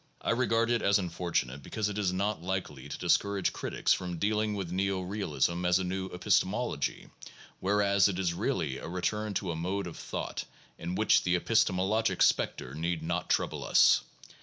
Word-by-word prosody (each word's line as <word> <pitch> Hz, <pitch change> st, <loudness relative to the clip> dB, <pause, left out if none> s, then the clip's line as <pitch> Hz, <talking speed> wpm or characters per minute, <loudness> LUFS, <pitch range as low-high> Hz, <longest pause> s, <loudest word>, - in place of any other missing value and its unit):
I -, -, +1 dB
regard 115 Hz, -1 st, +2 dB
it 120 Hz, -, +2 dB
as 100 Hz, +1 st, +4 dB
unfortunate 85 Hz, -7 st, -2 dB
because 105 Hz, +8 st, -2 dB
it 105 Hz, 0 st, -3 dB
is 95 Hz, -3 st, +1 dB
not 100 Hz, 0 st, -1 dB
likely 85 Hz, -7 st, -4 dB
to 75 Hz, -, -5 dB
discourage 100 Hz, +2 st, +1 dB
crit -, -, -5 dB
ics -, -, +3 dB
from 90 Hz, -1 st, -5 dB
dealing 105 Hz, +3 st, 0 dB
with 95 Hz, -4 st, -4 dB
neo 95 Hz, 0 st, 0 dB
realism 90 Hz, -3 st, -1 dB
as 90 Hz, 0 st, +4 dB
a 95 Hz, -, -1 dB
new 95 Hz, +1 st, -3 dB
epistemology, 95 Hz, -, 0 dB, 0.5 s
whereas 100 Hz, 0 st, +3 dB
it 95 Hz, -3 st, -2 dB
is 90 Hz, -3 st, 0 dB
really 85 Hz, -, -1 dB
a -, -, -7 dB
return 105 Hz, +4 st, -2 dB
to 90 Hz, -3 st, -1 dB
a -, -, -3 dB
mode 95 Hz, +4 st, -2 dB
of 85 Hz, -, -7 dB
thought -, -, -5 dB, 0.3 s
in 90 Hz, +2 st, -4 dB
which 110 Hz, -, +4 dB
the 90 Hz, 0 st, +1 dB
epistemologic 105 Hz, +1 st, +2 dB
specter 65 Hz, -, +1 dB
need 80 Hz, +1 st, -2 dB
not 85 Hz, +1 st, -2 dB
trouble -, -, 0 dB
us. -, -, +5 dB
95 Hz, 180 wpm, -30 LUFS, 85-105 Hz, 0.5 s, us